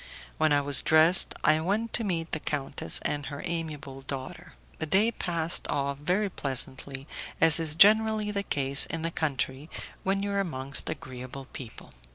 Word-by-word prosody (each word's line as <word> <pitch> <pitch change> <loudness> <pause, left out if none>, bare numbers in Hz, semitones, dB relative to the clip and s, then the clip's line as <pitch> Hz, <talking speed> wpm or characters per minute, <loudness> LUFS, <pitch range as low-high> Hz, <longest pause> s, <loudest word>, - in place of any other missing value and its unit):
When 155 -1 +2
I 145 0 +3
was 140 -2 +7
dressed 160 +4 +4
I 155 +1 +3
went 210 +7 -2
to 235 - 0
meet 170 -5 -3
the 160 - -2
countess 145 -2 -2
and 145 -1 -3
her 140 -1 -8
amiable 155 -5 -6
daughter. 135 -1 -7 0.3
The 160 - -4
day 205 +8 +2
passed 170 -5 -2
off 140 -1 -3
very 180 +8 0
pleasantly, 135 -3 -4 0.3
as 165 0 +6
is 155 -2 +1
generally 215 +2 +4
the 200 -1 -2
case 140 -6 +4
in 165 -1 -5
the 165 - -2
country, 140 -1 -3 0.3
when 195 +1 -1
you 200 - -3
are 200 - -1
amongst 140 -7 -4
agreeable 130 -1 -8
people. 125 -6 -11
155 Hz, 170 wpm, -27 LUFS, 140-185 Hz, 0.3 s, was